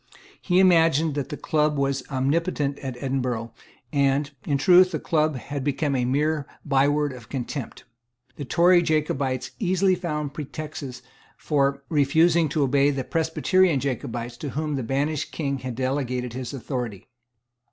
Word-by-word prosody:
He 180 -1 +1
imagined 165 -4 +4
that 140 -1 -3
the 150 - -5
Club 150 -1 +1
was 140 -1 0
omnipotent 145 +1 0
at 130 -3 -6
Edinburgh; 125 -4 -2 0.4
and, 140 0 +2 0.2
in 145 - +2
truth, 180 +5 +6
the - - -1
Club 155 -3 +1
had 135 +3 -5
become 145 0 0
a 125 -1 +1
mere 150 +3 0 0.2
byword 145 0 +2
of 125 -2 -12
contempt. 135 0 -5 0.5
The 145 - -6
Tory 175 +5 +4
Jacobites 145 -5 -1
easily 190 -2 +2
found 150 -5 -3
pretexts 145 -3 -7 0.3
for 140 -2 0
refusing 160 +2 +3
to 150 0 +1
obey 140 +1 +3
the 135 -2 -2
Presbyterian 165 +1 +2
Jacobites 120 -3 -4
to 145 - -5
whom 150 +2 -2
the 135 - -2
banished 140 +5 -1
King 140 -3 -2
had 125 -1 -5
delegated 130 -2 -2
his 125 -1 -5
authority. 120 -6 -5
140 Hz, 145 wpm, -24 LUFS, 130-155 Hz, 0.5 s, truth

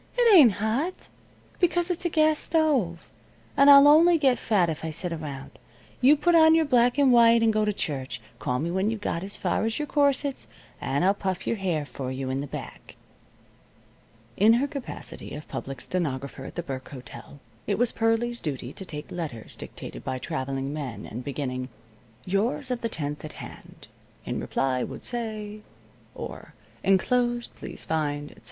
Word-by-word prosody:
"It 475 -3 +5
ain't 265 - +8
hot, 230 - -2 0.5
because 350 0 +2
it's 355 +1 -4
a - - +2
gas 310 -1 +3
stove. 275 - 0 0.5
And 280 +1 +6
I'll 280 0 +10
only 330 +3 +7
get 270 -5 +2
fat 200 -6 +2
if 160 -2 -4
I 160 - -2
sit 170 +2 -2
around. 145 -4 -7 0.4
You 280 +4 +6
put 345 +4 +2
on 320 -1 +7
your 325 -1 +3
black 245 -2 +3
and 280 -2 +5
white 230 -1 +6
and 225 -1 +3
go 215 0 +2
to 210 - +1
church. 140 -9 -4 0.2
Call 125 - -1
me 165 +6 -2
when 190 +3 +1
you've 225 -1 -3
got 170 -4 -2
as 195 +2 -6
far 180 +2 0
as 225 0 -1
your 300 - -2
corsets, 285 -1 0 0.3
and 140 +6 0
I'll 195 - +5
puff 190 -3 -3
your 230 - -1
hair 175 -6 -1
for 135 -2 -6
you 130 0 -3
in 135 +1 -1
the 145 - -5
back." - - -9 1.4
In 215 +3 +6
her 245 +4 +2
capacity 275 - -6
of 150 - -9
public 135 -2 -6
stenographer 140 -6 -3
at - - -9
the 175 - -3
Burke 130 -4 -6
Hotel, 140 +1 -11 0.3
it 200 - 0
was 245 0 +2
Pearlie's 230 +1 0
duty 135 -3 -4
to 190 - -7
take 150 -4 -8
letters 150 -11 -6
dictated - - -9
by 130 - -3
traveling 135 +2 -3
men 130 -9 -5
and 120 +3 -7
beginning: 130 -2 -4 0.6
"Yours 225 +7 0
of 245 - -2
the 230 - -1
10th 150 -5 -4
at 155 - -7
hand. - - -11 0.4
In - - -3
reply 130 -1 -1
would - - -7
say... 215 -3 -4 0.3
." - - -30
or: - - -8 0.3
"Enclosed 240 +5 +1
please - - -7
find, 145 -2 -2
etc." - - -17
200 Hz, 185 wpm, -26 LUFS, -, 1.4 s, I'll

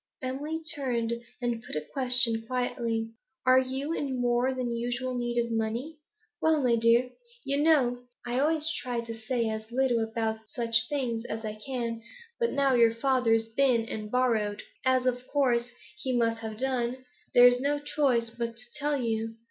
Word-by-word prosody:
Emily 295 +5 -3
turned 240 -6 -1 0.3
and 240 -1 -1
put 240 - -6
a 150 0 -3
question 250 -4 +4
quietly. 230 -3 -2 0.3
'Are 255 0 +6
you 265 +4 -2
in 270 -5 -2
more 245 +1 +2
than 250 -2 -2
usual 245 +2 -2
need 240 -1 -2
of 235 0 0
money?' 230 +8 -2 0.4
'Well, 315 -3 +3
my 240 -2 +4
dear, 235 +2 +3 0.3
you 280 +1 +1
know 250 -6 +3 0.2
I 245 +1 -1
always 310 +2 +2
try 250 -7 -2
to 230 -1 -7
say 230 +1 -1
as 220 +1 -5
little 250 -1 +2
about 220 -1 -3
such 230 -2 +1
things 250 -6 -2
as 220 -1 -5
I 215 - -3
can, 230 0 -4 0.4
but 470 -1 +1
now 275 -1 +2
your 230 -2 +4
father's 230 -3 +2
been 240 -1 +2
and 215 -2 -5
borrowed 225 -4 0 0.2
as 260 -1 +2
of 250 0 -1
course 245 -4 +1 0.3
he 255 -2 -1
must 230 -1 +1
have 220 -1 -6
done 255 0 -2 0.3
there's 245 0 +7
no 285 +1 +1
choice 275 -6 0
but 235 0 -4
to 245 - -4
tell 295 -1 -1
you. 225 -2 -2
245 Hz, 170 wpm, -28 LUFS, 230-260 Hz, 0.4 s, there's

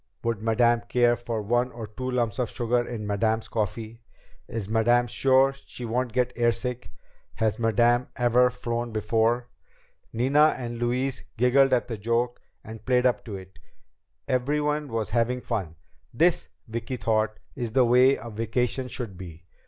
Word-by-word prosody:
"Would 115 -3 -1
Madame 115 +1 +3
care 120 -1 +3
for 115 -2 -4
one 120 +4 +1
or 115 -2 -7
two 130 +5 -6
lumps 120 -4 -1
of 125 - 0
sugar 120 0 0
in 115 -3 -5
Madame's 110 +2 0
coffee?" 110 +2 -4 0.5
"Is 110 -4 -4
Madame 120 +3 +3
sure 135 +3 +3
she 130 -2 -9
won't 120 +2 -1
get 125 +1 0
airsick?" 120 +1 -1 0.5
"Has 110 0 0
Madame 120 +2 +3
ever 125 0 +4
flown 120 -1 -4
before?" 115 +3 +1 0.6
Nina 140 +6 +3
and 120 -2 -5
Louise 125 +2 -1
giggled 130 +3 +4
at 125 -1 +2
the 115 -4 -5
joke 115 +3 -1 0.2
and 110 0 -10
played 125 -1 +2
up 125 - +2
to 105 -4 -6
it. 95 -1 -11 0.7
Everyone 150 +3 0
was 115 -5 -3
having 120 +2 +1
fun. 100 -10 -4 0.4
This, 170 +8 +2 0.2
Vicki 115 +3 -4
thought, 110 0 0 0.2
is 120 -4 -4
the 130 -1 +5
way 125 +3 +5
a 115 - -9
vacation 115 +4 -1
should 115 -7 -6
be! 85 -2 -10
120 Hz, 155 wpm, -26 LUFS, 110-125 Hz, 0.7 s, the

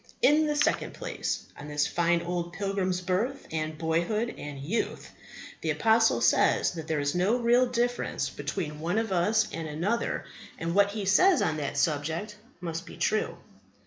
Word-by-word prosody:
In 305 +1 +5
the 300 - 0
second 290 - +1
place, - - -3
on 145 - -8
this 150 0 +1
fine 170 0 +1
old 175 0 -3
pilgrim's 190 -2 -1
birth 205 +10 -1
and 155 -1 -3
boyhood 170 +9 0
and 145 -1 -7
youth. 170 +12 -3 0.5
The - - -2
apostle 225 0 +3
says - - +3
that 165 -3 -7
there 155 -2 0
is 145 0 0
no 190 +7 +2
real 245 +1 +4
difference 245 0 -1
between 150 -5 -4
one 175 +6 -1
of 225 -2 0
us 210 +5 +2
and 165 0 -4
another; 180 +10 -1 0.3
and 165 +1 -2
what 200 +1 +4
he 205 -1 -4
says 360 - +5
on 155 -2 0
that 145 -1 -3
subject 160 +8 -1 0.3
must 170 0 -4
be - - -10
true. 215 - 0
180 Hz, 170 wpm, -28 LUFS, 160-225 Hz, 0.5 s, In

